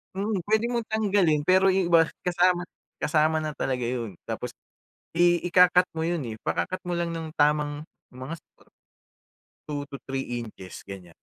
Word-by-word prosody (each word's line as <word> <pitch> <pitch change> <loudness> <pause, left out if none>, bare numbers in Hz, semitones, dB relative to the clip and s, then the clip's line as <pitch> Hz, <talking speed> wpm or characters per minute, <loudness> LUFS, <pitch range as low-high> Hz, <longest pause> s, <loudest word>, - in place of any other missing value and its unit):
Mm, 200 -1 -1
pwede 220 +1 +3
mong 235 -2 -2
tanggalin 195 -9 +2
pero 190 +1 +5
yung 190 -1 +2
iba 165 - +8 0.2
kasama 180 0 +2 0.3
kasama 155 0 +2
na 155 -1 -2
talaga 125 -4 -2
yun. 115 -6 -3
Tapos - - -4 0.7
i 175 0 +4
ika-cut 180 +1 +5
mo 160 - -1
yun 170 -1 0
eh, 110 - -5
ipaka-cut 185 - -2
mo 175 - -2
lang 170 0 -1
ng 165 -1 -5
tamang 150 0 +1 0.3
mga 130 +6 -6
su - - -18 1.3
2 145 -1 -3
to 140 - -7
3 130 -3 -3
inches 95 -5 -10
ganyan. 90 -4 -10
165 Hz, 160 wpm, -26 LUFS, 140-180 Hz, 1.3 s, iba